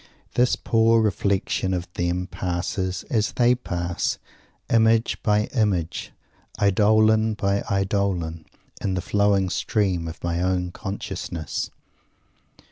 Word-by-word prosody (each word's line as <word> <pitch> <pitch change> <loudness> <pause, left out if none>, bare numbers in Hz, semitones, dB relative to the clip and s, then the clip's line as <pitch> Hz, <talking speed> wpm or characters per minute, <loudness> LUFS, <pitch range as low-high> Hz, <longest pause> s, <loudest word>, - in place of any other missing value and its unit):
This 125 +1 +3
poor 115 0 +3
reflection 100 -3 0
of 90 0 -4
them 90 +1 -1
passes, 90 0 -3
as 110 -3 +1
they 120 0 +4
pass, 85 -8 -2 0.5
image 115 0 +3
by 105 0 +2
image, 95 - 0 0.5
eidolon 110 +2 +4
by 100 -1 0
eidolon, 95 -5 -1 0.4
in 95 -2 0
the 90 - -1
flowing 100 0 +2
stream 95 -7 0
of 80 - -8
my 85 0 -1
own 90 -1 0
consciousness. 95 -4 -4
100 Hz, 110 wpm, -24 LUFS, 90-110 Hz, 0.5 s, they